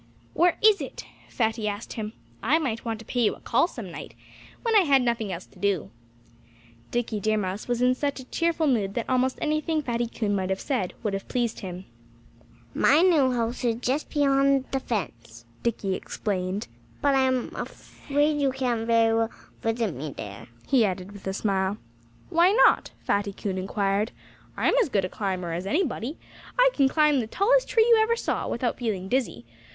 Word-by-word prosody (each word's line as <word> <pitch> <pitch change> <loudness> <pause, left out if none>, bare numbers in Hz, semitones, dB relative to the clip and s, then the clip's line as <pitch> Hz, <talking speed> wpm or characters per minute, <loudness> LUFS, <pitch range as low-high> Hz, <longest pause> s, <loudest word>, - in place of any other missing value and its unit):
"Where 345 0 +3
is 430 -2 +6
it!" - - -7 0.2
Fatty 225 -2 -1
asked 205 +2 -4
him. 215 -1 -5 0.3
"I 280 +8 +3
might 255 -8 -2
want 225 -2 -3
to 225 - -12
pay 245 - -1
you 220 - +2
a - - -17
call 250 +8 +2
some 225 - -8
night - - -9 0.5
when 460 -2 +1
I - - +9
had 280 -8 +4
nothing 235 -4 -1
else 180 0 -5
to - - -20
do." 190 - 0 1.0
Dickie 240 -3 -1
Deer 215 +2 +1
Mouse 195 0 -3
was 245 0 0
in 250 0 +5
such 280 +2 -2
a - - -8
cheerful 335 +4 0
mood 210 -8 +1
that 235 - -2
almost 255 0 +1
anything 305 0 0
Fatty 240 -2 -1
Coon 215 -3 -1
might 190 -1 -1
have 190 0 -1
said 230 -11 -2
would 210 -3 -1
have 195 - -4
pleased 240 -3 -1
him. 185 -1 -7 0.9
"My 300 +5 +4
new 305 -8 +4
house 235 0 -2
is 235 -2 +2
just 255 +5 -2
beyond 275 -2 +3
the 270 - 0
fence," 120 - -5 0.2
Dickie 210 -5 -1
explained. 190 0 -3 0.3
"But 285 -1 +2
I'm 260 -2 +1
afraid 295 +1 -2
you 275 -1 +2
can't 245 -4 -1
very 230 -1 +4
well 225 0 +1 0.3
visit 225 -4 0
me 145 +1 -6
there," 100 -1 -8 0.2
he 265 -4 +4
added 185 -1 -2
with 200 -1 -10
a - - 0
smile. 195 0 0 0.5
"Why 345 +2 +5
not?" 470 - +5
Fatty 200 0 0
Coon 195 -1 -3
inquired. 200 +2 0 0.5
"I'm - - +2
as 415 - 0
good 200 -6 +1
a - - -4
climber 185 -5 -3
as 180 +3 -4
anybody. 285 - -1 0.4
I - - +6
can 275 -2 +3
climb 300 -1 +3
the 225 - -2
tallest - - +2
tree 450 - +4
you 460 -2 +6
ever 455 +1 +2
saw, - - -2
without 240 0 -2
feeling 205 -6 -2
dizzy. 220 - -1
235 Hz, 190 wpm, -26 LUFS, 200-275 Hz, 1.0 s, I